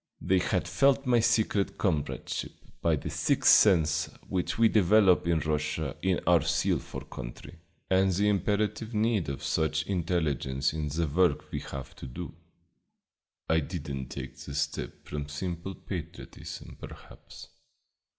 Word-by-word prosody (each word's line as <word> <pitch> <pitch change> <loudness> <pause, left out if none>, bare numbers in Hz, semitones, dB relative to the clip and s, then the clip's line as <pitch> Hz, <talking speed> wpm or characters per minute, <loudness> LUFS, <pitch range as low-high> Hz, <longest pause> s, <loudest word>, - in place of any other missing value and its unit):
They 95 0 +2
had 90 0 0
felt 135 +9 +3
my 120 -2 +4
secret 110 -3 +1
comradeship 80 -8 -2 0.3
by - - +3
that - - -5
sixth - - +3
sense 80 -6 +5 0.2
which 90 -2 -2
we 115 0 +6
develop 100 -3 +4
in 85 -2 +2
Russia 75 +1 -2
in 95 -2 +1
our 85 -2 +5
zeal - - +1
for - - -8
country, - - -9 0.3
and 95 0 +3
the 100 +3 +1
imperative 105 +2 0
need 105 -5 +1
of 70 - -5
such 80 0 0
an - - -5
intelligence 75 -7 0
in 80 -1 -2
the 80 +4 0
work 80 +1 +1
we - - -2
have 70 -2 -8
to - - -8
do. 60 - -7 1.1
"I 80 0 +3
did 75 -1 -5
n't 65 -2 -5
take - - -7
the 70 - -8
step 70 - -3
from 75 0 -5
simple 85 +5 -4
patriotism, 85 -3 -8
perhaps. - - -12
85 Hz, 150 wpm, -29 LUFS, 75-100 Hz, 1.1 s, we